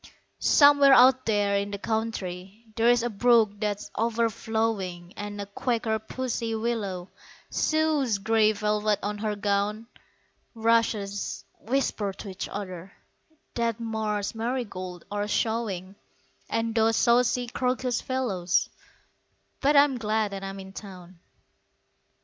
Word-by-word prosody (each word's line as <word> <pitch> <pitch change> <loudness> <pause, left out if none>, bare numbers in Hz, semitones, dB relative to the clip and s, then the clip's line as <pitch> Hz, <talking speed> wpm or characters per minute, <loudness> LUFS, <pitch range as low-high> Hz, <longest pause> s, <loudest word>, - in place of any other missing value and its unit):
Somewhere 285 -2 +6
out 255 +1 +6
there 205 -2 +2
in 200 0 -2
the 200 - -4
country 205 -2 -4
There's 235 +1 +3
a - - +1
brook 215 -1 +3
that's 210 -1 -3
overflowing, 220 -5 -1
And 205 0 -6
a 200 - -3
quaker 220 +1 -1
pussy 230 0 -3
willow 210 -6 -3 0.4
Sews 310 -8 +1
grey 215 +1 +3
velvet 210 0 0
on 205 0 -3
her 210 -1 -1
gown; 205 +2 -1 0.7
Rushes 220 -3 0
whisper 220 -4 -1
to 200 - -9
each 190 0 -6
other 185 -2 -7 0.6
That 235 -1 -1
marsh 215 -3 -2
marigolds 220 -7 -4
are 205 0 -2
showing, 210 -4 -1 0.6
And 225 0 -1
those 225 0 +3
saucy 245 +1 +3
crocus 250 0 -1
fellows 195 -8 0 0.9
But 290 +1 +3
I'm 280 -3 +5
glad 215 -1 0
that 195 0 -6
I'm 195 0 -6
in 190 0 -10
town. 185 -4 -11
220 Hz, 120 wpm, -26 LUFS, 200-235 Hz, 0.9 s, Somewhere